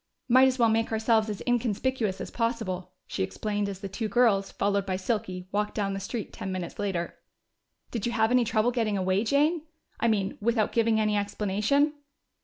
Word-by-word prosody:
"Might 260 +2 +6
as 260 0 0
well 235 -2 +4
make 225 +1 +1
ourselves 220 0 +2
as 210 - -4
inconspicuous 240 -3 0
as - - -6
possible," 225 -6 -2
she - - -4
explained, 205 - -2
as 195 -1 -7
the 200 - -4
two 215 +3 -3
girls, 210 -4 +3
followed 200 0 0
by 190 -1 -2
Silky, 185 -2 -3
walked 210 +1 -1
down 200 -2 -1
the 195 - -3
street 220 +2 -5
ten 190 - -5
minutes 185 0 -5
later. 190 -4 -2 0.7
"Did 230 -2 -2
you - - -1
have 220 0 +2
any 250 -1 +5
trouble 220 +1 +1
getting 225 -4 0
away, 190 +2 +1
Jane? 295 +7 +2 0.4
I 235 - +2
mean, 200 -3 0
without 225 -1 +1
giving 230 -1 +2
any 215 -1 +2
explanation?" 210 +8 +1
215 Hz, 190 wpm, -27 LUFS, 195-235 Hz, 0.7 s, Might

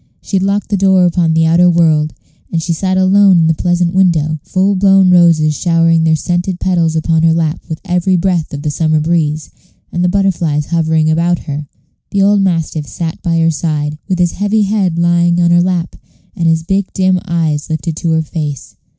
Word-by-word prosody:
She 195 - -3
had 185 - -1
locked 200 +1 -1
the 205 - 0
door 190 -1 +3
upon 170 -2 +1
the 160 0 +2
outer 170 +2 +4
world, 160 -3 +1 0.4
and 165 - -1
she 170 +1 -2
sat 185 +3 -1
alone 190 0 +4
in 165 - +3
the 160 - +2
pleasant 175 +1 -1
window, 160 -5 +1
the - - -30
full 195 +2 +1
blown 195 -1 +4
roses 165 -3 +4
showering 165 0 +1
their 160 0 +3
scented 175 +2 -3
petals 170 -3 0
upon 160 0 0
her 165 0 +3
lap 160 -1 -2
with 160 - -5
every 180 +1 0
breath 175 -3 -1
of 145 0 -7
the 150 - -2
summer 155 0 0
breeze, 155 -1 -1 0.4
and 175 - -2
the 180 - +2
butterflies 175 -6 0
hovering 160 -1 +1
about 170 +2 +1
her. 145 -1 -5 0.4
The 200 -1 0
old 200 0 +3
mastiff 165 -5 -2
sat 165 +2 -5
by 165 -1 -1
her 165 0 +2
side, 150 -1 -3
with 185 - 0
his 175 -1 +1
heavy 205 +2 0
head 195 -4 -1
lying 170 0 +2
on 170 -1 +2
her 175 0 +4
lap, 175 -1 -2 0.4
and 170 - -1
his 160 0 +1
big 190 +3 -2
dim 185 -1 +1
eyes 160 -4 -2
lifted 160 0 -3
to 170 - -2
her 160 0 +1
face. 150 -3 -6
170 Hz, 205 wpm, -13 LUFS, 160-185 Hz, 0.4 s, outer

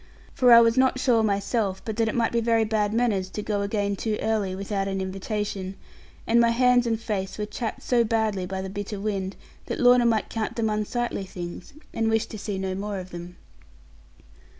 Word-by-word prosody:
For 250 -2 +4
I 235 0 +10
was 230 +1 +3
not 260 0 +3
sure 240 -3 +3
myself, 200 -1 0
but 220 - -3
that 225 -1 +2
it 220 - -2
might 235 -2 +1
be 235 - +1
very 230 -1 +3
bad 210 -1 0
manners 215 -5 +1
to 210 +2 -5
go 205 -1 -1
again 200 0 -1
too 215 +1 -2
early 210 -4 0
without 195 0 -2
an 195 0 -2
invitation; 195 0 -3 0.5
and 235 +1 +4
my 235 - +4
hands 245 0 +3
and 225 -1 0
face 195 -4 -3
were 210 - -2
chapped 220 +2 -5
so 240 -2 +3
badly 215 -4 0
by 190 0 -4
the 190 - -5
bitter 205 0 -5
wind, 195 -2 -2 0.3
that - - -3
Lorna 245 -1 +6
might 220 -2 +1
count 220 -2 -3
them 220 -2 0
unsightly 215 +1 -2
things, 175 +1 -8 0.2
and 225 0 0
wish 225 0 +2
to 220 -1 -9
see 200 -1 -4
no 190 0 -2
more 200 +1 -4
of 185 0 -8
them. 175 +1 -8
210 Hz, 205 wpm, -25 LUFS, 195-230 Hz, 0.5 s, I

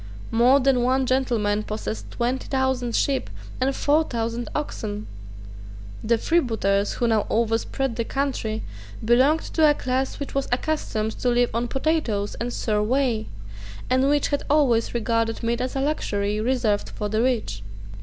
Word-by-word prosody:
More 245 +4 +5
than 265 -2 +3
one 260 +2 +2
gentleman 235 -5 +1
possessed 215 +1 -5
twenty 250 +2 -2
thousand 265 -3 0
sheep 275 -2 +1 0.3
and 265 +1 +1
four 300 +2 +3
thousand 230 -3 -3
oxen. 215 -8 -4 1.0
The 230 +1 +2
freebooters 220 - +1
who 240 - 0
now 220 -2 +2
overspread 230 +3 0
the 230 - +1
country 240 -4 -2 0.4
belonged 260 +7 +4
to 315 -2 +3
a 295 - +3
class 260 0 -2
which 280 - -5
was 275 0 -1
accustomed 245 -5 -1
to 250 - +1
live 245 0 +2
on 235 +2 0
potatoes 265 -7 0
and 240 +1 -4
sour 210 -3 0
whey, 235 -1 +1 0.6
and 260 +2 +3
which 290 -1 +2
had 285 - 0
always 255 -7 +2
regarded 230 0 0
meat 235 +1 0
as 255 +1 -3
a - - 0
luxury 210 -8 -1
reserved 225 -4 0
for 210 - -4
the 215 +2 0
rich. 235 - 0
245 Hz, 155 wpm, -24 LUFS, 220-270 Hz, 1.0 s, More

